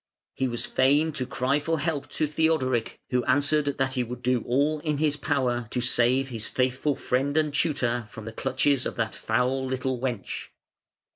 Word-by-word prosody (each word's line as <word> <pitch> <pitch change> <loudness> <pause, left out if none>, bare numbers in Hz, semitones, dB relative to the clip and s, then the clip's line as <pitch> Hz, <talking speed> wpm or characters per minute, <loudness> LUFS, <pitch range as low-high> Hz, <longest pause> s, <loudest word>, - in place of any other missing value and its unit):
He 130 - 0
was 120 -1 -2
fain 145 +5 +3
to 130 -4 -3
cry 135 +3 +1
for 165 +2 -1
help 145 -2 -2
to 155 - +1
Theodoric, 150 -6 0
who 125 -1 +2
answered 145 +2 +2
that 135 0 0
he 125 -2 0
would 125 +1 -7
do 125 -1 +2
all 145 +5 +2
in 150 -1 -1
his 150 -1 +2
power 130 -5 0
to 125 - -1
save 125 +2 +2
his 115 -3 -4
faithful 130 +3 0
friend 135 +5 0
and 155 -2 +2
tutor 120 -7 0
from 110 -3 -9
the 115 - -6
clutches 135 +1 +1
of - - -6
that 115 -1 -1
foul 125 +4 0
little 130 -1 -2
wench. 120 -6 -3
130 Hz, 185 wpm, -26 LUFS, 125-145 Hz, -, fain